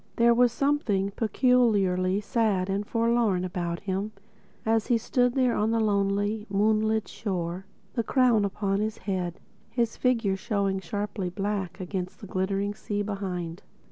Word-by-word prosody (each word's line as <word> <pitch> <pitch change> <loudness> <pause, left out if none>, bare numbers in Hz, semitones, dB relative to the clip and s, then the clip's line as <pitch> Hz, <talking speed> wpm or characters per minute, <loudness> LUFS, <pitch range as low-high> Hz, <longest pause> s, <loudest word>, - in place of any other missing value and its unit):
There 235 0 +5
was 245 0 +4
something 230 -7 +1
peculiarly 205 -5 +2
sad 205 -4 +1
and 200 +1 -2
forlorn 230 -5 +2
about 175 -1 -3
him 200 +2 -3 0.5
as 225 0 +2
he 240 - +4
stood 245 +2 +1
there 255 -3 +3
on 215 +1 +1
the 230 0 +1
lonely, 205 +1 0
moonlit 215 +2 +2
shore, 185 -2 -4 0.3
the 235 - +1
crown 240 -3 +3
upon 200 0 -1
his 215 0 -2
head, 185 -3 -3 0.3
his 230 0 -1
figure 230 -6 +2
showing 195 -1 -1
sharply 200 +1 -3
black 195 0 -3
against 185 0 -4
the - - -9
glittering 195 +2 -1
sea 205 0 -3
behind. 185 -4 -4
205 Hz, 140 wpm, -27 LUFS, 190-225 Hz, 0.5 s, There